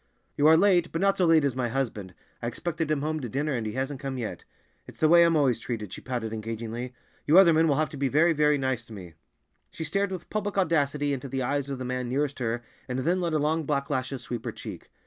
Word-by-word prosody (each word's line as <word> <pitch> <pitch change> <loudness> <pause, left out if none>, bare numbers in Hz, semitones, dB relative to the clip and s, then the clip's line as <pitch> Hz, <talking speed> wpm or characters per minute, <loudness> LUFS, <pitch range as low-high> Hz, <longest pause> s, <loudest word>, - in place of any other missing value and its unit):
"You 145 - +4
are 160 +1 +7
late, 180 -2 +3
but 165 - -2
not 195 +1 +2
so 180 - +4
late 160 -2 +5
as 140 -3 0
my 125 -2 0
husband. 110 -8 -3 0.3
I 115 - -2
expected 165 +5 -3
him 150 -2 0
home 155 +1 -1
to 125 -5 -5
dinner, 145 +5 -1
and 115 -4 -2
he 105 - -4
hasn't 135 +1 -3
come 135 -2 -4
yet. 115 -3 -5 0.4
It's - - -13
the 155 - +4
way 170 +2 +7
I'm 170 -1 +3
always 135 -6 +2
treated," 110 -5 -5
she - - -8
pouted 120 -4 -4
engagingly; 115 +3 -5 0.3
"you 155 +4 +6
other 180 -4 +8
men 160 +1 +4
will 145 - +3
have 155 +2 +1
to 150 - -9
be 135 0 +1
very, 155 +6 +3
very 150 -1 +3
nice 130 -3 -1
to 115 - -12
me." 90 -5 -10 0.6
She 160 - -6
stared 195 +5 -1
with 185 -3 -7
public 205 -1 -2
audacity 145 -5 +1
into 135 0 -5
the 130 0 -2
eyes 140 +2 -1
of 135 - -3
the 130 - -5
man 125 -1 -3
nearest 140 +2 -1
her, 120 0 -2 0.2
and 125 -1 -3
then 175 +8 +1
let 170 -2 -1
her 155 - +2
long 155 +2 +1
black 140 0 -2
lashes 130 -1 -2
sweep 120 -1 -5
her 115 - -2
cheek. - - -9
140 Hz, 260 wpm, -27 LUFS, 125-160 Hz, 0.6 s, other